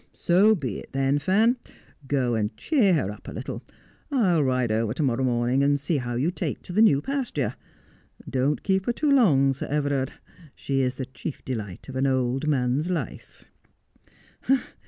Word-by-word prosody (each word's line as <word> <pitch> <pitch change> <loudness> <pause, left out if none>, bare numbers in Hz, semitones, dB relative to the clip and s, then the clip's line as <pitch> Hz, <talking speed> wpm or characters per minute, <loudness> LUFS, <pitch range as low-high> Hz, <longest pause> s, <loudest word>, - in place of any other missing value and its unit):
' - - -42 0.2
So 200 +5 +6
be 130 - -4
it - - -13
then, 135 +1 +1
Fan. 220 - +3 0.5
Go 130 -4 +1
and 105 -1 -1
cheer 225 - +3
her 105 -10 0
up 105 - -12
a - - -5
little. - - -6 0.5
I'll 190 - +2
ride 130 -3 +1
over 110 +1 0
to 155 - -1
morrow 130 -1 +1
morning 125 +1 +1
and 145 0 +3
see 145 +3 0
how 120 -2 -3
you 140 +8 +1
take - - -4
to 180 - -7
the 215 - +3
new 145 -11 +5
pasture. 265 - -2 0.7
Don't 135 +3 0
keep 190 -1 0
her 240 - +2
too 300 +3 0
long, 145 - +4
Sir 135 - -5
Everard; 145 -2 -1 0.4
she 135 -1 -1
is 130 0 0
the 130 - -4
chief 130 +3 -8
delight 105 -8 -5
of 135 - -8
an 135 +1 +1
old 130 +2 0
man's 135 +3 +1
life.' 180 -2 -5
140 Hz, 180 wpm, -25 LUFS, 125-175 Hz, 0.7 s, So